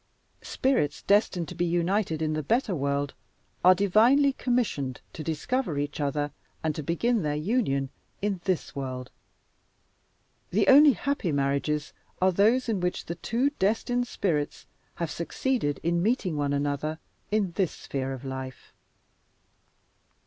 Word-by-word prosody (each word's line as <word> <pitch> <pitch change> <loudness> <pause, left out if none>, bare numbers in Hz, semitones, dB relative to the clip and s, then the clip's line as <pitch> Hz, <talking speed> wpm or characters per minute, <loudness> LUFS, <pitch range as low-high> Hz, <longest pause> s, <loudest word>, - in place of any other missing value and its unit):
Spirits 250 - 0
destined 195 -4 +2
to - - -7
be 175 - -1
united 175 -1 0
in 155 0 0
the 155 - -1
better 225 - +1
world 140 -2 -1 0.5
are 185 +1 +8
divinely 230 +9 +4
commissioned 215 - -1
to 155 - -6
discover 165 - -1
each 145 +1 -3
other 145 0 -1 0.3
and 160 -1 +1
to 155 - -4
begin 210 - +1
their 150 -2 -1
union 150 - 0 0.3
in 200 -3 -2
this 185 -3 -1
world. 130 -2 -5 1.4
The - - +1
only 285 +1 +8
happy 280 - -1
marriages 140 +2 0 0.3
are 185 0 +4
those 225 +8 +3
in 220 -4 0
which 180 0 -2
the 170 - -3
two 245 +10 0
destined 240 +5 +1
spirits 155 -11 -2 0.3
have 170 -3 -3
succeeded 170 - -1
in 170 +1 +1
meeting 200 -5 0
one 145 -1 0
another 145 +2 -1 0.3
in 205 -3 +1
this 180 0 0
sphere 135 -1 -4
of 135 0 -7
life. 130 -1 -7
170 Hz, 140 wpm, -27 LUFS, 145-215 Hz, 1.4 s, are